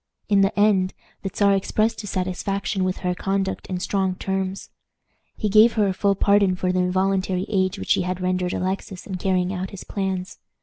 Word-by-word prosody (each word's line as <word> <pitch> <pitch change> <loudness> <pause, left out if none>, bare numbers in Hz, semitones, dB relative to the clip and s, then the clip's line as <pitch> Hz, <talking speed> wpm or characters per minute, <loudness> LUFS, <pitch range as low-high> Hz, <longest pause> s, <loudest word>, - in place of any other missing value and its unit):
In 200 -1 +4
the 195 +1 +1
end, 195 -3 +3 0.3
the 195 - -3
Czar 200 +1 +3
expressed 215 +4 0
his 205 - -7
satisfaction 190 +1 -2
with 185 0 -1
her 180 - +1
conduct 195 +1 -2
in 185 -1 -3
strong 190 0 0
terms. 190 0 -3 0.7
He 215 - -1
gave 215 +3 +6
her 215 -2 +2
a 190 - 0
full 200 +1 +1
pardon 200 -1 +3
for 180 0 0
the 185 - 0
involuntary 185 0 +1
aid 190 -1 0
which - - -3
she - - +4
had 180 0 -2
rendered 180 0 -1
Alexis 190 0 -3
in 190 -2 -4
carrying 185 0 0
out 185 0 -3
his 195 - -9
plans. 190 -1 -3
190 Hz, 190 wpm, -23 LUFS, 185-200 Hz, 0.7 s, gave